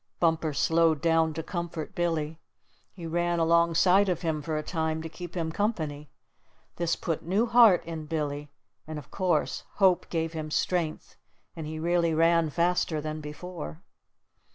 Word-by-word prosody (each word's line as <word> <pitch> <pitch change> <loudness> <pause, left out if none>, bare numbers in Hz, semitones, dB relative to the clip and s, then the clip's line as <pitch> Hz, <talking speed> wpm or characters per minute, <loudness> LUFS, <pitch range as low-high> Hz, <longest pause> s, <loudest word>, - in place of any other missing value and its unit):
Bumper 165 -2 +2
slowed 160 +1 +3
down 165 0 +2
to 160 - -3
comfort 170 -3 -5
Billy. 165 -2 -1 0.5
He 175 -3 -9
ran 175 +1 0
alongside 170 +4 +4
of 180 -1 -1
him 160 -2 -1
for 155 +1 -2
a 155 - -2
time 160 -1 -2
to 165 - -5
keep 175 +1 -9
him 160 -1 -1
company. 155 -8 -2 0.7
This 170 -1 0
put 165 -2 -3
new 195 +7 +1
heart 230 -6 +6
in 160 -2 -6
Billy, 150 -2 -3 0.4
and 155 -1 -5
of 145 - -10
course 180 -5 0
hope 190 -3 +3
gave 165 -1 -2
him 155 -1 -4
strength 165 0 -2 0.4
and 160 -2 -6
he 155 +1 -5
really 170 0 +1
ran 165 0 +3
faster 170 0 +1
than 155 +1 -4
before. 150 - -8
165 Hz, 155 wpm, -28 LUFS, 155-175 Hz, 0.7 s, heart